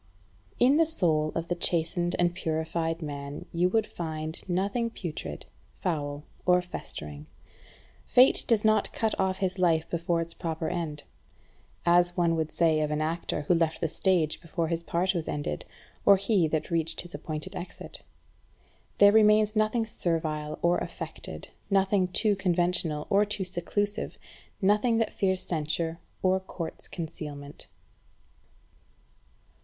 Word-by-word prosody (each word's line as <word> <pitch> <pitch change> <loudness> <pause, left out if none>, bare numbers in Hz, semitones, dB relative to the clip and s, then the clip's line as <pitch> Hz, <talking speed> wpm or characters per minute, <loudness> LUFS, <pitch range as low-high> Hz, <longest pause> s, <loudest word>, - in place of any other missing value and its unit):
8. - - +6
In 275 +4 +5
the 330 - +5
soul 160 - +1
of 165 0 -2
the 175 - 0
chastened 175 +1 0
and 175 0 +2
purified 165 0 -2
man 140 -1 -6
you 175 +2 +2
would 220 +2 +2
find 160 -2 -5
nothing 200 +6 0
putrid, 155 - -6 0.3
foul, 145 -4 -2 0.2
or 180 0 +5
festering. 75 - -7 0.8
Fate 255 +2 +6
does 225 -3 +2
not 215 0 +3
cut 220 -1 0
off 190 0 +1
his 190 -1 -1
life 165 -3 +3
before 170 0 0
its 165 0 -3
proper 160 -2 -3
end; 160 -5 -3 0.8
as 175 0 +4
one 170 -1 +3
would 160 -1 -1
say 160 -2 +3
of 150 - 0
an 150 0 -1
actor 160 0 -1
who 175 - +3
left 165 -2 +1
the 165 - 0
stage 165 -2 +1
before 165 0 -2
his 165 -1 -1
part 175 +3 0
was 170 -3 -3
ended, 145 - -3 0.4
or 200 -1 +7
he 195 -3 +2
had 155 +1 -2
reached 165 -1 0
his 175 - -10
appointed 155 -2 -5
exit. 175 - -7 1.0
There 205 0 +8
remains 215 0 +5
nothing 215 +2 +2
servile 155 -6 -2
or 175 +1 +3
affected, - - -6 0.2
nothing 195 -1 +3
too 205 +3 +2
conventional 175 -4 +1
or 200 +1 +5
too 210 -1 -2
seclusive, 195 +3 -2 0.5
nothing 210 +4 +3
that 225 - 0
fears 190 -1 +1
censure 165 +1 -1 0.2
or 190 0 +3
courts 170 -3 -7
concealment. 150 -4 -7
175 Hz, 145 wpm, -28 LUFS, 160-190 Hz, 1.0 s, There